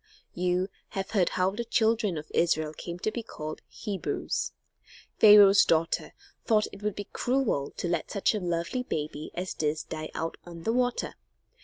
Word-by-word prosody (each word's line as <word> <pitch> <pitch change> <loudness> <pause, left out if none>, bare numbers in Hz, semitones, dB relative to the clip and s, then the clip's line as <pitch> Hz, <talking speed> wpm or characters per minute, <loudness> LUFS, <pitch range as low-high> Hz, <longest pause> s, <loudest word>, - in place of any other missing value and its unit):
You 180 +1 0 0.3
have 195 - -3
heard 195 -5 +3
how 185 +1 +1
the 225 +4 -3
children 220 -5 +1
of 150 - -8
Israel 155 -2 +2
came 170 +2 -6
to 215 - 0
be 235 - -4
called 155 -8 -7
Hebrews. 205 -3 -3 0.7
Pharaoh's 205 -2 +9
daughter 165 0 +1 0.3
thought 215 -2 +3
that - - -5
it - - -19
would 210 -1 -1
be 205 - -6
cruel 245 - 0
to - - -2
let 170 -2 -1
such 200 +1 +1
a 215 - -1
lovely 175 +7 -1
baby 155 -8 -4
as 180 0 -3
this 155 0 -1
die 155 0 -6
out 165 +1 -3
on 170 -1 -10
the 225 - +1
water. 245 0 0
185 Hz, 175 wpm, -28 LUFS, 165-215 Hz, 0.7 s, Pharaoh's